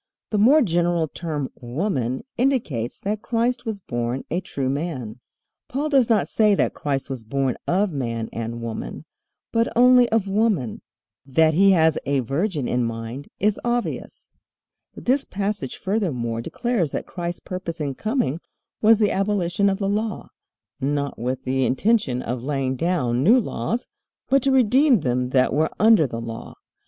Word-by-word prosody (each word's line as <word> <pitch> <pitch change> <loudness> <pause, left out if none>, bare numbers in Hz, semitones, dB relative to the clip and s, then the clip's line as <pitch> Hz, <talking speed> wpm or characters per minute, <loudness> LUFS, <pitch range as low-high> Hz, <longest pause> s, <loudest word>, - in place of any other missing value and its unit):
The 210 - +1
more 275 +8 +6
general 175 -3 +1
term 150 -4 -4
"woman" 130 - -2
indicates 225 - 0
that 210 +1 -2
Christ 245 +2 0
was 220 -3 -3
born 120 -5 -3
a 175 +3 0
true 135 -7 -3
man. 130 -5 -3 0.5
Paul 290 +4 -2
does 270 -5 +3
not 220 -3 +3
say 215 -2 +3
that - - +1
Christ 135 -2 -2
was 130 -4 -6
born 130 +2 -1
of 190 +2 +2
man 115 -6 -3
and 115 +1 -4
woman, 115 -1 -6 0.5
but 230 0 +2
only 250 0 +6
of 220 -3 +1
woman. 195 - 0 0.4
That 155 +4 +3
he 195 +4 +5
has 160 -3 +3
a 140 -1 +2
virgin 145 - -1
in 125 0 0
mind 115 +4 -5
is 210 +1 +1
obvious. 240 0 -3 0.6
This 265 +3 +1
passage 200 -8 -3
furthermore 135 - -1
declares 225 - -1
that - - -3
Christ's 175 -1 -5
purpose 175 -3 -5
in 145 -3 -2
coming 215 - -1 0.4
was 220 +1 +6
the 210 -1 +2
abolition 195 -1 +1
of 195 - 0
the 195 -1 -2
Law, 210 +1 -2 0.5
not 140 +1 -2
with 125 +2 -3
the 130 +1 0
intention 135 - +1
of 120 +1 -3
laying 135 -1 -1
down 130 -6 0
new 230 - +6
laws, 235 0 -2 0.4
but 275 +1 +4
"to 275 - +2
redeem 260 - +4
them 125 -1 0
that 130 0 +2
were 155 +3 +2
under 215 -9 +6
the 115 -2 -5
law." 115 0 -7
170 Hz, 160 wpm, -23 LUFS, 130-215 Hz, 0.6 s, more